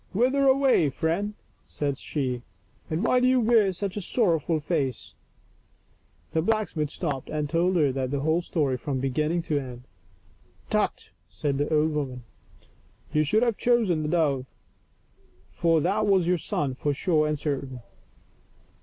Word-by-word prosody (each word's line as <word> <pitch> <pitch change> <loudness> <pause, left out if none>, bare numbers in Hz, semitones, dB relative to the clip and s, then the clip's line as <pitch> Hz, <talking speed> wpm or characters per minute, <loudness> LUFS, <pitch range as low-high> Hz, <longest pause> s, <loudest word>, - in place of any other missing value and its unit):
" - - -32
Whither 260 +6 +3
away, 265 - +4
friend 175 +9 -2 0.2
?" - - -39
said 140 -2 -1
she, 130 -5 -3 0.2
" - - -34
and 160 +5 -1
why 250 +2 +3
do 250 - +3
you 255 0 +4
wear 225 -4 +4
such 190 +1 -4
a 205 - -3
sorrow 180 -4 +2
ful 160 +2 -1
face?" 145 -5 -2 1.2
The 160 - +2
blacksmith 185 -6 0
stopped 145 -5 -4
and 150 -1 -2
told 175 +4 +1
her 150 -5 +3
the 135 +1 -2
whole 160 +3 +1
story 145 -7 -1
from 135 0 -3
beginning 150 +6 0
to 150 -3 0
end. 125 -2 -8 0.5
" - - -33
Tut - - -1
!" - - -44
said 140 -2 -2
the 145 - -1
old 155 0 +3
woman, 135 -5 -3 0.4
" - - -32
you 150 - +3
should 215 +10 +2
have 235 -4 +1
chosen 225 -10 +2
the 150 - -2
dove, 145 -6 +1 1.0
foi 165 -1 +2
that 205 +6 +1
was 190 -3 +3
your 180 0 +1
son 145 -3 -2
for 145 +2 -2
sure 155 0 +2
and 150 0 -1
certain." 135 -4 -4
160 Hz, 170 wpm, -26 LUFS, 140-195 Hz, 1.2 s, away